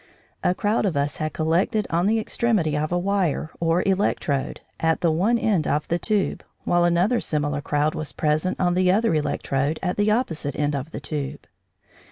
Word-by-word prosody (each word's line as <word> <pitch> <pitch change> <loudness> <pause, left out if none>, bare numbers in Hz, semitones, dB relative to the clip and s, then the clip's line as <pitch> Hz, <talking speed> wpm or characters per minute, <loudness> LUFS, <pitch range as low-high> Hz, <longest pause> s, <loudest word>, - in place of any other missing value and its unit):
A 180 - +2
crowd 210 +1 +1
of 165 -6 -1
us 145 +1 -1
had 155 0 -2
collected 175 +7 +1
on 170 +3 +2
the 220 +2 +3
extremity 215 -8 0
of 150 +2 -1
a 175 - +1
wire, 180 -4 0
or 165 +1 +2
"electrode," 185 -8 0 0.2
at 160 0 +1
the 170 - +3
one 200 +9 +2
end 210 -9 +1
of 150 +1 0
the 170 - +1
tube, 210 -1 0 0.2
while 175 0 +2
another 180 +8 +2
similar 145 -1 -1
crowd 145 +2 0
was 155 - -4
present 155 +4 0
on 175 -1 +2
the 180 0 +3
other 220 0 +2
electrode 150 -1 -1
at 180 -1 -1
the 205 +1 +2
opposite 165 - -1
end 145 0 0
of 140 +2 -4
the - - -6
tube. 145 -3 -5
170 Hz, 190 wpm, -23 LUFS, 150-195 Hz, 0.2 s, the